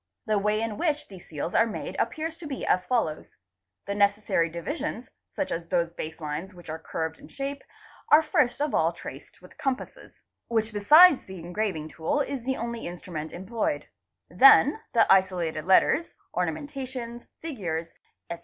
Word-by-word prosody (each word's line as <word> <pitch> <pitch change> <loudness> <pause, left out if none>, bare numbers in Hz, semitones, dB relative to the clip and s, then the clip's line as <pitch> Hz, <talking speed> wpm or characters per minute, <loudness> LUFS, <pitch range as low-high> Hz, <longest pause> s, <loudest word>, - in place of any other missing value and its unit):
The 215 -1 +2
way 210 +1 +1
in 220 -2 -4
which 300 -3 0
— - - -34
these 190 -3 -12
seals 160 +2 -4
are 225 - +4
made 215 - -5
appears 320 0 -2
to 325 - -7
be 270 -2 -4
as 180 0 +1
follows:—the 95 - -4
necessary 200 -4 +2
divisions, 225 - -5
— - - -58
such 290 - -2
as 165 0 -3
those 170 0 0
base 160 -1 -6
lines 155 +5 -5
which 175 -3 -9
are 160 - -5
curved 160 0 -4
in - - -13
shape, 280 +1 -5 0.5
are 310 +1 +7
first 295 -6 +1
of 295 -1 0
all 165 +2 +2
traced 140 +2 -11
with 180 - -14
the - - -20
compasses, 270 -2 -4 0.3
which 225 -1 0
besides 300 - +7
the 190 0 -9
engraving 175 -2 -3
tool 160 - -1
is 275 -3 -2
the 265 0 -1
only 235 0 -4
instru 175 +1 -8
ment 155 0 -4
employed; 230 - -3 0.4
then 275 +2 +6 0.2
the 225 - +6
isolated 175 -5 +1
letters, 270 - +3 0.2
ornamentations, 260 -5 -4
figures, 170 - -4 0.4
etc. 170 - -4
205 Hz, 170 wpm, -27 LUFS, 165-265 Hz, 0.5 s, are